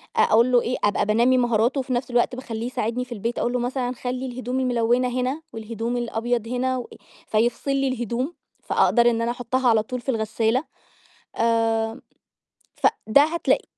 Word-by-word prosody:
أقول 235 +3 +4
له 245 -1 +5
إيه 250 +2 -2
أبقى 205 - +2
بانّمي 235 +5 +3
مهاراته 240 +2 +2
وفي 260 -1 -2
نَفْس 250 +1 -2
الوقت 245 +1 +2
باخلّيه 230 -3 -5
يساعدني 245 0 -2
في 250 - -24
البيت، 230 +1 -3
أقول 240 - 0
له 250 - 0
مثلًا 245 0 -2
"خلّي 250 +1 -4
الهدوم 255 0 -3
الملونة 245 0 +2
هنا 265 +5 -2
والهدوم 230 +2 -4
الأبيض 235 0 -2
هنا 255 +2 -1
و" 245 - -5 0.4
فيفصل 235 +5 +1
لي 275 0 +1
الهدوم، 250 - -2 0.3
فأقدر 240 0 +3
إن 230 -1 0
أنا 235 +1 0
أحطها 245 +1 0
على 220 -2 +3
طُول 250 +2 -5
في 270 - -6
الغسالة. 225 +2 0 0.7
آمم 225 -1 +1 0.8
فده 280 - +3
هتلاق 340 +9 0
240 Hz, 165 wpm, -23 LUFS, 230-255 Hz, 0.8 s, له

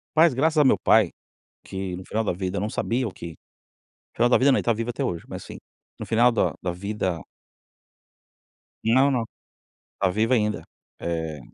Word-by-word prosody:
Mas 160 -1 +6
graças 155 +5 +1
a 150 - +6
meu 130 - +4
pai, 110 -6 +4 0.5
que 95 -2 -5
no 95 - -9
final 110 +3 -2
da - - 0
vida 95 +2 -3
eu - - -1
não 105 +2 -2
sabia 125 +3 -1
o 105 - -5
que 85 -3 -9 0.8
final 120 +1 +3
da - - +5
vida 140 +2 +4
não - - +3
está 115 - +1
vivo 115 +2 -3
até 120 +3 -2
hoje 85 -10 -3
mas - - -7
sim, - - -10 0.4
no - - -5
final 120 +2 +4
da 115 - +1
da 90 - -2
vida 95 -2 -3 1.6
Não, 130 +5 +4
não. 125 -3 0 0.7
Está 95 - 0
vivo 110 +6 +1
ainda. 105 -3 +1 0.4
Eh 80 -3 -3
110 Hz, 185 wpm, -24 LUFS, 95-125 Hz, 1.6 s, Mas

